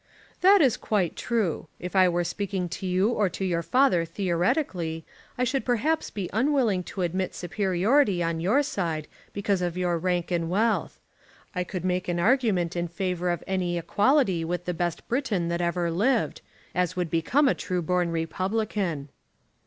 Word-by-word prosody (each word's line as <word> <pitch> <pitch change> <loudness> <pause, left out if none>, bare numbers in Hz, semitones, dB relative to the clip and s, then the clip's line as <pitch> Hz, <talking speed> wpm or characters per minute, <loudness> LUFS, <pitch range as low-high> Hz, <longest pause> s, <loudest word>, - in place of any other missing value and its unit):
"That 390 +1 +7
is 260 -6 +4
quite 195 -6 0
true. 215 -9 -1
If 180 +2 -6
I 185 -1 +6
were 175 0 0
speaking 185 +1 -2
to 185 +2 -5
you 185 +4 +2
or 210 -5 +1
to 190 +3 -4
your 170 -2 0
father 250 -5 +3
theoretically 170 - -1 0.3
I 250 - +1
should 260 +2 0
perhaps 265 +7 0
be 195 -4 -4
unwilling 235 -5 +2
to 190 - -4
admit 185 +2 -2
superiority 190 - +1
on 165 -1 -1
your 210 - +3
side 165 - -2 0.2
because 200 -2 -1
of 175 0 -2
your 175 -2 0
rank 180 0 -1
and 170 -2 0
wealth. 220 +5 0 0.5
I 180 - -1
could 185 0 -5
make 180 0 0
an 175 -1 -1
argument 195 -5 +2
in 175 0 -1
favour 180 0 -2
of 175 - -2
any 180 -2 -1
equality 200 - +2
with 175 +1 -3
the 180 - -1
best 175 -1 -3
Briton 225 -10 0
that 170 +1 -1
ever 170 0 0
lived, 215 +11 +1 0.3
as 180 -2 0
would 175 -3 -2
become 245 - +2
a - - +4
true 180 -2 -3
born 180 +1 +1
Republican." 185 -2 -2
180 Hz, 170 wpm, -26 LUFS, 175-215 Hz, 0.5 s, That